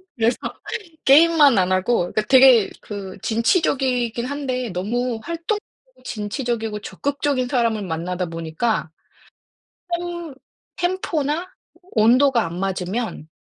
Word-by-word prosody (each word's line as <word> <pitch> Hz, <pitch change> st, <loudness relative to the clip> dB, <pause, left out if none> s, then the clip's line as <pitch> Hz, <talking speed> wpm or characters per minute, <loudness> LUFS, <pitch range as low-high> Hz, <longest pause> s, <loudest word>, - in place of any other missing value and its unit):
그래서 230 Hz, -1 st, +1 dB, 0.7 s
게임만 295 Hz, -3 st, +6 dB
안 185 Hz, 0 st, +2 dB
하고 185 Hz, 0 st, +1 dB
그 215 Hz, -, +1 dB
되게 255 Hz, -5 st, +7 dB
그 200 Hz, -2 st, -7 dB
진취적이긴 245 Hz, -, +1 dB
한데 255 Hz, -3 st, -3 dB
너무 230 Hz, +6 st, -2 dB
활동 335 Hz, +5 st, -2 dB, 0.5 s
진취적이고 225 Hz, -1 st, -3 dB
적극적인 280 Hz, -1 st, -2 dB
사람을 230 Hz, -4 st, +1 dB
만나다 180 Hz, +1 st, -3 dB
보니까 165 Hz, +5 st, -2 dB, 1.0 s
템 345 Hz, -4 st, -4 dB, 0.6 s
템포나 320 Hz, -2 st, -2 dB, 0.4 s
온도가 240 Hz, +3 st, +4 dB
안 170 Hz, +2 st, -6 dB
맞으면 190 Hz, -1 st, -3 dB
240 Hz, 235 characters per minute, -21 LUFS, 200-280 Hz, 1.0 s, 되게